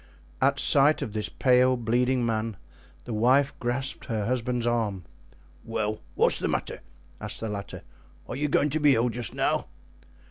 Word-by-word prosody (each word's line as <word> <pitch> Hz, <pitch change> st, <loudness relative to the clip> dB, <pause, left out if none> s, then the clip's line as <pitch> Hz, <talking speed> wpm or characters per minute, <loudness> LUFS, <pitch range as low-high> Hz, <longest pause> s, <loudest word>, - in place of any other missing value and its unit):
At -, -, +3 dB
sight 145 Hz, +2 st, +4 dB
of 105 Hz, -, -6 dB
this 105 Hz, -1 st, -2 dB
pale, 130 Hz, 0 st, +3 dB
bleeding 120 Hz, +2 st, +1 dB
man, 110 Hz, -2 st, -2 dB, 0.5 s
the 120 Hz, -, -5 dB
wife 130 Hz, +6 st, +3 dB
grasped 130 Hz, +3 st, -3 dB
her 110 Hz, -5 st, -2 dB
husband's 125 Hz, 0 st, -1 dB
arm. 110 Hz, -6 st, -1 dB, 0.6 s
"Well, 110 Hz, -1 st, -3 dB, 0.2 s
what's -, -, +3 dB
the -, -, -1 dB
matter?" -, -, -3 dB, 0.4 s
asked -, -, -4 dB
the 110 Hz, -, -4 dB
latter, 100 Hz, -3 st, -6 dB, 0.4 s
"are -, -, -5 dB
you 150 Hz, +3 st, -1 dB
going 145 Hz, 0 st, +1 dB
to 155 Hz, -, 0 dB
be 145 Hz, -2 st, +5 dB
ill 115 Hz, +2 st, +1 dB
just 120 Hz, -1 st, -4 dB
now?" -, -, 0 dB
120 Hz, 165 wpm, -26 LUFS, 110-130 Hz, 0.6 s, be